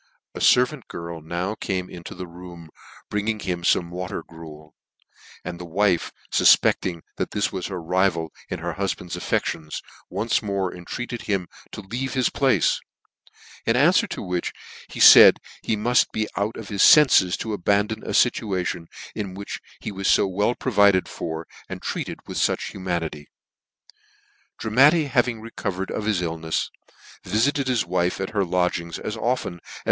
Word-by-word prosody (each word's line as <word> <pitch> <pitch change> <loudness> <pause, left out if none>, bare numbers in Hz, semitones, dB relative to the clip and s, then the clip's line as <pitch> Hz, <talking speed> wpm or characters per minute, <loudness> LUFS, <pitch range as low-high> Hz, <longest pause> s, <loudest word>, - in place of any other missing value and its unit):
A - - -7
fervant 125 +2 +3
girl 85 -1 -7
now 85 +6 -3
came 95 -4 -3
into 85 -2 -9
the 90 0 -6
room,, 85 -2 -12 0.4
bringing 105 +1 -1
him 90 -3 -3
fome 85 0 +2
water 90 +1 -5
gruel; 80 -2 -13 0.7
and 85 -1 -6
the - - -6
wife 90 +1 +1 0.2
fufpecting 85 -3 +4 0.2
that - - -2
this 105 - -1
was 95 -2 -4
her 95 -2 -5
rival 85 -1 0 0.2
in - - -3
her 85 +1 -4
hufband's 95 -3 -3
affections, 75 -2 -2 0.3
once 115 +1 0
more 100 -3 -2
entreated 120 +7 -6
him 95 -3 0 0.2
to - - -7
leave 120 +6 -4
his 130 -1 +2
place; 135 -3 +2 0.9
in 115 - +3
anfwer 155 +9 +4
to - - -5
which 90 -2 -2 0.4
he - - -8
faid - - +10 0.2
he 110 - -1
muft 120 +3 +3
be 110 -1 -1
out 105 +3 -2
of 110 - -8
his 100 -2 -1
fenfes 130 - +6
to 110 - -4
abandon 105 +3 0
a - - -10
fituation 95 -7 0 0.3
in 100 -4 -5
which 100 +1 -6 0.2
he - - -5
was 100 0 0
fo - - +4
well 105 +5 0
provided 100 -6 +3
for, 80 0 -5 0.2
and - - -7
treated - - -4
with - - -4
fuch - - 0
humamity. 85 -6 -4 1.3
Dramatti 140 +9 +4
having 120 -3 +1
recovered 100 -4 -4
of 105 - -3
his 105 -5 0
illnefs, 80 -1 -2 0.5
viftt 115 +7 +2
ted 140 -2 -2
his 125 -6 +1
wife 90 +1 0
at 95 - -3
her 105 -3 +1
lodgings 90 -2 -1
as 105 - -5
often 120 -5 -1
as. - - -13
95 Hz, 160 wpm, -23 LUFS, 85-110 Hz, 1.3 s, faid